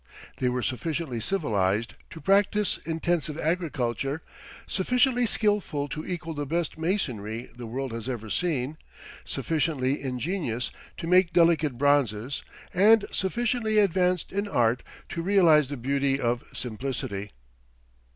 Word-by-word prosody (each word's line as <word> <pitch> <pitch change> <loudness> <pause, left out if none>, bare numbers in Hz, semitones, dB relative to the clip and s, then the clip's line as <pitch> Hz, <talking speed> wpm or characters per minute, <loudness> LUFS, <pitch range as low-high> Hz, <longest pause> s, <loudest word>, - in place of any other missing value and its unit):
They 125 - +1
were 125 0 -1
sufficiently 140 0 -2
civilized 110 - 0 0.2
to 160 - -9
practice 200 +4 +2
intensive 165 -2 0
agriculture, 150 - -1 0.4
sufficiently 245 - +2
skillful 205 -10 +1
to 155 - -4
equal 175 -2 -4
the 145 -2 -4
best 170 +2 -1
masonry 125 - -2
the 120 -1 -7
world 130 +3 -3
has 115 +2 -5
ever 115 -4 -4
seen, 155 -4 0 0.5
sufficiently 145 -4 0
ingenious 130 - -2 0.3
to - - -5
make 180 0 +4
delicate 160 -6 +3
bronzes, 135 -3 +1 0.3
and 210 +4 +6
sufficiently 220 +2 0
advanced 180 -3 +2
in 200 +1 -1
art 120 - +2 0.3
to 170 - -3
realize 165 -6 +5
the 145 +1 -5
beauty 135 +2 +1
of 120 -1 0
simplicity. 110 -4 -4
150 Hz, 120 wpm, -27 LUFS, 125-180 Hz, 0.5 s, and